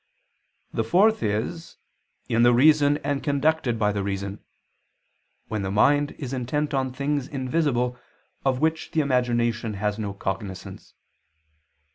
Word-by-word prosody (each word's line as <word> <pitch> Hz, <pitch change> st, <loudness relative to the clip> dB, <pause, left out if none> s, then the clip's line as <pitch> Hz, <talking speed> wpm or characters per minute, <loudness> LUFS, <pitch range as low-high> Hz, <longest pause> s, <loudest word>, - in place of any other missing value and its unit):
The 115 Hz, -, 0 dB
fourth 210 Hz, -, +3 dB
is 110 Hz, +11 st, -3 dB, 0.5 s
in 115 Hz, 0 st, +2 dB
"the 120 Hz, 0 st, +6 dB
reason 145 Hz, +2 st, +5 dB
and 145 Hz, -1 st, -1 dB
conducted 145 Hz, -3 st, +1 dB
by 105 Hz, -2 st, +2 dB
the 100 Hz, -1 st, -2 dB
reason," 100 Hz, 0 st, -4 dB, 1.0 s
when 110 Hz, -2 st, -3 dB
the 95 Hz, -, -2 dB
mind 145 Hz, +8 st, +3 dB
is 135 Hz, -3 st, -6 dB
intent 145 Hz, +4 st, -2 dB
on 130 Hz, -1 st, 0 dB
things 140 Hz, +1 st, -2 dB
invisible 130 Hz, -3 st, -1 dB, 0.4 s
of 130 Hz, -2 st, +1 dB
which 160 Hz, +1 st, -1 dB
the 160 Hz, -, +3 dB
imagination 120 Hz, -4 st, 0 dB
has 105 Hz, +1 st, -2 dB
no 100 Hz, -2 st, -4 dB
cognizance. 95 Hz, -1 st, -6 dB
125 Hz, 130 wpm, -25 LUFS, 110-145 Hz, 1.0 s, the